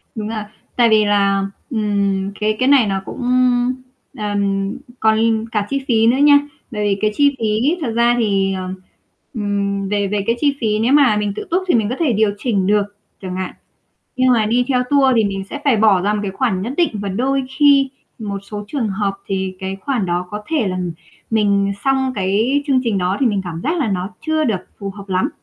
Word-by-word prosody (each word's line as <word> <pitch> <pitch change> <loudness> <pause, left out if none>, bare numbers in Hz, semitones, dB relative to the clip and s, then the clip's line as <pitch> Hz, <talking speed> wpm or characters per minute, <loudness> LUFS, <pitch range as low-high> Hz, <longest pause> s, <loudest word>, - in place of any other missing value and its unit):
Đúng 215 -2 -4
rồi. 220 -1 -3 0.3
Tại 235 -2 +4
vì 215 -1 +4
là, 200 -1 +2 0.2
ừm, 200 -4 0
cái 215 0 +1
cái 255 - +2
này 275 -6 +5
nó 195 -1 -1
cũng, - - -7
ưm, 250 0 +2 0.4
ờm, 200 -1 -1 0.2
còn 220 0 +2
cả 210 -2 -1
chi 275 0 -2
phí 225 -3 +3
nữa 245 +3 +3
nha, 285 0 +6 0.3
bởi 210 -2 -3
vì 200 -1 +1
cái 215 - +2
chi 285 +1 +3
phí 225 +10 +1
thật 245 - -2
ra 235 +1 +3
thì 195 -3 +1
ờ, 185 -1 -4 0.7
ừm, 200 -3 -2
về 205 -1 0
về 205 0 -1
cái 230 - +2
chi 285 0 +2
phí 215 -2 +1
nếu 235 +5 +2
mà 270 -8 +5
mình 205 -1 -1
tự - - -5
túc 370 +2 +1
thì - - +3
mình 215 -3 +1
có 250 - -2
thể 290 -8 +2
điều 210 -1 +2
chỉnh 200 -5 0
được 210 0 +3 0.4
chẳng 185 -1 -5
hạn. 185 -1 -4 0.6
Nhưng 255 0 +4
mà 220 -3 +2
đi 240 +3 +2
theo 250 -2 +2
tour 275 -2 +4
thì 220 - +4
mình 195 -1 -3
sẽ 290 - -5
phải 275 -5 +4
bỏ 210 -3 +4
ra 210 +1 +1
một 210 - -1
cái 200 - -2
khoản 195 -5 -1
nhất 235 +6 -3
định 345 -2 +2
và 205 -1 -4
đôi 265 +8 0 0.2
khi 280 -2 +5 0.3
một 205 -3 -4
số 205 +1 -7
trường 245 -5 -2
hợp 195 0 -1
thì 190 -1 -2
cái 190 +1 -4
khoản 240 -5 -1
đó 175 +1 -1
có 210 0 -5
thể 300 -10 0
là 185 - -3 0.5
mình 200 -2 +2
xong 265 -1 +1
cái 215 +8 +1
chương 270 -3 +3
trình 220 -4 0
đó 185 +1 0
thì 265 - +3
mình 205 -4 +1
cảm 165 -2 -5
giác 335 +3 -1
là 275 -9 0
nó 185 0 -2 0.2
chưa 315 0 +1
được 215 -9 0 0.2
phù 200 -1 -5
hợp 200 0 -11
lắm, 185 0 +1
215 Hz, 225 wpm, -18 LUFS, 200-255 Hz, 0.7 s, nha